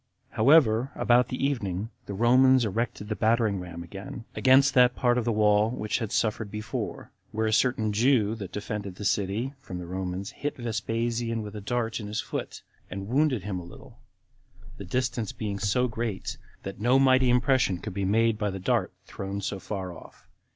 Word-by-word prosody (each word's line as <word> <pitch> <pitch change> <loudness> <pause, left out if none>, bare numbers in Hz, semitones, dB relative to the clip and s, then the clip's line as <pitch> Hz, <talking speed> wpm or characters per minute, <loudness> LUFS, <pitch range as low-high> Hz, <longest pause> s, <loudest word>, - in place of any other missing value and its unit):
However, 125 -1 +4
about 120 +1 +3
the 125 +2 -2
evening, 110 -6 -2 0.2
the 100 - -5
Romans 130 +3 +5
erected 110 0 -2
the 110 - -2
battering 110 -3 +2
ram 85 -1 -7
again, 100 +6 -8
against 135 +1 +5
that 125 -1 +5
part 120 -2 +2
of 120 -2 0
the 120 - +1
wall 105 0 +3
which 110 -3 -2
had 115 -4 -4
suffered 110 -1 0
before; 105 0 -5 0.2
where 110 +1 -1
a 110 - +1
certain 110 -3 +2
Jew 110 -1 +3
that 100 -5 -7
defended 100 -2 -5
the 105 - -7
city 105 +7 0
from 95 -9 -7
the 90 - -6
Romans 95 +2 -4
hit 145 - -4
Vespasian 115 0 -2
with 105 0 -8
a 105 - -6
dart 115 +2 -2
in 105 - -6
his 105 +1 -3
foot, - - -5 0.3
and 100 +2 -6
wounded 135 -5 +2
him 95 -2 -3
a - - -8
little, 85 - -14 0.8
the 100 - -8
distance 120 +1 -1
being 100 -2 -4
so 125 +5 +1
great, 115 -4 -4 0.3
that 95 0 -7
no 125 +4 +4
mighty 130 -1 +4
impression 125 -5 +3
could 105 +3 -7
be 100 +1 -2
made 110 +3 +2
by 105 -2 0
the 95 - -4
dart 95 +1 0
thrown 100 +1 -5
so 100 0 -3
far 95 -3 -5
off. - - -15
110 Hz, 185 wpm, -27 LUFS, 100-120 Hz, 0.8 s, Romans